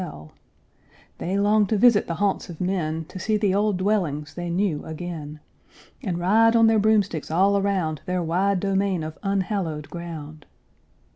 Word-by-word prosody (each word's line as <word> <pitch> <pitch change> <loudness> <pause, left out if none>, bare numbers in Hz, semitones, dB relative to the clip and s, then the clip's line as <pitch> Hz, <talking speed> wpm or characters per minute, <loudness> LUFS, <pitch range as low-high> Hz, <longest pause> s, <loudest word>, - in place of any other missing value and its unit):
They 190 +3 -2
long 205 +1 +3
to 215 - +1
visit 225 -1 +5
the 170 - -2
haunts 200 0 -1
of 165 - -9
men, 165 -4 -2
To 185 - -9
see 215 +3 0
the 205 -3 +1
old 205 -1 +1
dwellings 170 -8 -1
they 175 +2 -5
knew 175 -3 0
again, 160 -2 -7 0.6
And 180 -5 -2
ride 220 +6 +4
on 230 0 +6
their 225 -1 +4
broomsticks 205 -7 +1
all 190 +5 +3
around 190 -6 0
Their 180 -1 -1
wide 185 +4 +1
domain 195 -3 0
of 155 0 -7
unhallowed 190 -7 -2
ground. 155 -3 -8
185 Hz, 155 wpm, -24 LUFS, 160-200 Hz, 0.6 s, on